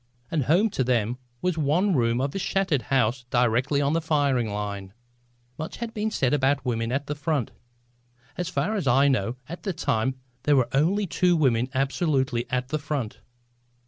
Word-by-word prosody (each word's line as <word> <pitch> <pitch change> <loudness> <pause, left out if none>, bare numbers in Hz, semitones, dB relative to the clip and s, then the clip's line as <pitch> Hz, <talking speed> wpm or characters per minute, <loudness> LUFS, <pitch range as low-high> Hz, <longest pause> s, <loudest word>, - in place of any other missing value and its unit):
And 150 -6 0
home 190 - +3
to 130 - 0
them 120 -1 0 0.2
was 180 -3 0
one 170 +7 +2
room 120 -1 +2
of 140 +1 -1
a - - -2
shattered 190 -7 +1
house 125 -2 +1
directly 125 +3 +2
on 140 +2 +1
the 165 - +1
firing 140 -7 +1
line. 100 -2 -4 0.7
Much 155 - -5
has 235 -1 -4
been 215 0 -1
said 130 - 0
about 140 0 +2
women 115 -1 -1
at 140 +2 -1
the 150 - -3
front. 145 -4 -1 0.8
As 180 -1 -3
far 205 +4 -1
as 190 -9 -2
I 135 +3 +5
know 125 -3 +1
at 170 +3 -7
that 190 -5 -4
time 130 -3 0 0.3
there 145 +2 +3
were 125 -3 +2
only 180 +9 +2
two 180 0 +2
women 125 -4 +2
absolutely 135 -3 0
at 125 0 -1
the 155 +1 -1
front. 145 -7 -4
140 Hz, 180 wpm, -25 LUFS, 125-160 Hz, 0.8 s, I